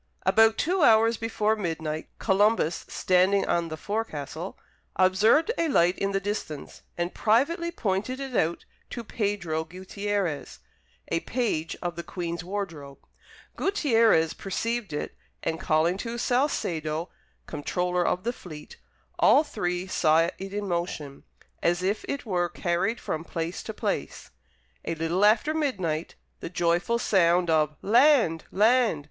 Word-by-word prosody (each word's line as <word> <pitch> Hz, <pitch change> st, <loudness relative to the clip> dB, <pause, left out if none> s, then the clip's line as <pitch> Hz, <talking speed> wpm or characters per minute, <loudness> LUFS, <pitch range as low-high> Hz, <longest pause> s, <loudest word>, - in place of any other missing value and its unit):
About 220 Hz, +4 st, +5 dB
two 360 Hz, +3 st, +1 dB
hours 225 Hz, -3 st, +5 dB
before 220 Hz, -1 st, 0 dB
midnight, 160 Hz, -5 st, -4 dB
Columbus, 200 Hz, -4 st, +2 dB
standing 185 Hz, +2 st, +2 dB
on 170 Hz, -1 st, +1 dB
the 160 Hz, -1 st, -6 dB
forecastle, 175 Hz, -5 st, -4 dB, 0.4 s
observed 210 Hz, -, +4 dB
a 335 Hz, -, +2 dB
light 180 Hz, -, +3 dB
in 195 Hz, 0 st, 0 dB
the 195 Hz, -, +1 dB
distance, 195 Hz, -7 st, -5 dB, 0.2 s
and 175 Hz, +1 st, -2 dB
privately 305 Hz, -, +2 dB
pointed 215 Hz, -, -2 dB
it 270 Hz, -3 st, -5 dB
out 165 Hz, -2 st, 0 dB, 0.2 s
to 235 Hz, -, -6 dB
Pedro 200 Hz, -8 st, -2 dB
Guttierez, 190 Hz, 0 st, -3 dB, 0.5 s
a 165 Hz, -, +1 dB
page 190 Hz, -8 st, -2 dB
of 175 Hz, -1 st, -3 dB
the 170 Hz, -, -4 dB
Queen's 170 Hz, -1 st, -5 dB
wardrobe. 170 Hz, -8 st, -5 dB, 0.6 s
Guttierez 230 Hz, -, +3 dB
perceived 230 Hz, +2 st, -3 dB
it, 150 Hz, -, -4 dB, 0.3 s
and 160 Hz, -, -2 dB
calling 165 Hz, +4 st, +2 dB
to 235 Hz, +1 st, -4 dB
Salcedo, 170 Hz, -, -1 dB, 0.4 s
comptroller 180 Hz, +4 st, -1 dB
of 180 Hz, +1 st, 0 dB
the 240 Hz, +2 st, -1 dB
fleet, 155 Hz, -9 st, -11 dB, 0.4 s
all 295 Hz, -, +6 dB
three 180 Hz, -, -3 dB
saw 160 Hz, -3 st, +3 dB
it 195 Hz, 0 st, -7 dB
in 205 Hz, 0 st, -3 dB
motion, 170 Hz, -6 st, -4 dB, 0.4 s
as 175 Hz, +1 st, +1 dB
if 200 Hz, +3 st, 0 dB
it 280 Hz, -, -4 dB
were 175 Hz, -4 st, 0 dB
carried 180 Hz, +6 st, -1 dB
from 160 Hz, -, -4 dB
place 165 Hz, +1 st, -4 dB
to -, -, -6 dB
place. -, -, -4 dB, 0.5 s
A 165 Hz, -, -3 dB
little 165 Hz, +4 st, 0 dB
after 230 Hz, +9 st, +4 dB
midnight, 185 Hz, -, -2 dB, 0.2 s
the -, -, -6 dB
joyful 175 Hz, +6 st, +1 dB
sound 175 Hz, -6 st, +3 dB
of 155 Hz, -1 st, +2 dB
"Land! 235 Hz, -, +4 dB
Land!" 225 Hz, -3 st, +3 dB
185 Hz, 135 wpm, -26 LUFS, 165-225 Hz, 0.6 s, all